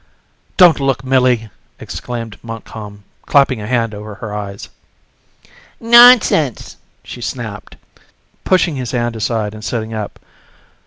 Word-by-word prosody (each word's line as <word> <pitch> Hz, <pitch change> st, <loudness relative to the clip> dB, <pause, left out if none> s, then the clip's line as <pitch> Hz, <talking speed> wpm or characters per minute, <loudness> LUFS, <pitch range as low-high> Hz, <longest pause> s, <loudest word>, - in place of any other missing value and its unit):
"Don't 175 Hz, -5 st, +6 dB
look, 135 Hz, -2 st, -1 dB
Millie!" 125 Hz, -4 st, +1 dB, 0.3 s
exclaimed 115 Hz, -3 st, -7 dB
Montcalm, 110 Hz, -3 st, -9 dB, 0.2 s
clapping 135 Hz, -5 st, +3 dB
a 105 Hz, -, -6 dB
hand 115 Hz, -2 st, 0 dB
over 105 Hz, 0 st, -8 dB
her 105 Hz, 0 st, -7 dB
eyes. 100 Hz, -1 st, -6 dB, 1.1 s
"Nonsense!" 235 Hz, -, +5 dB, 0.3 s
she -, -, -10 dB
snapped, -, -, -6 dB, 0.7 s
pushing 175 Hz, -5 st, +1 dB
his 125 Hz, -2 st, -5 dB
hand 120 Hz, -1 st, -1 dB
aside 110 Hz, -1 st, -2 dB
and 110 Hz, 0 st, -11 dB
sitting 110 Hz, -1 st, -4 dB
up. 105 Hz, -3 st, -6 dB
115 Hz, 115 wpm, -16 LUFS, 110-135 Hz, 1.1 s, Don't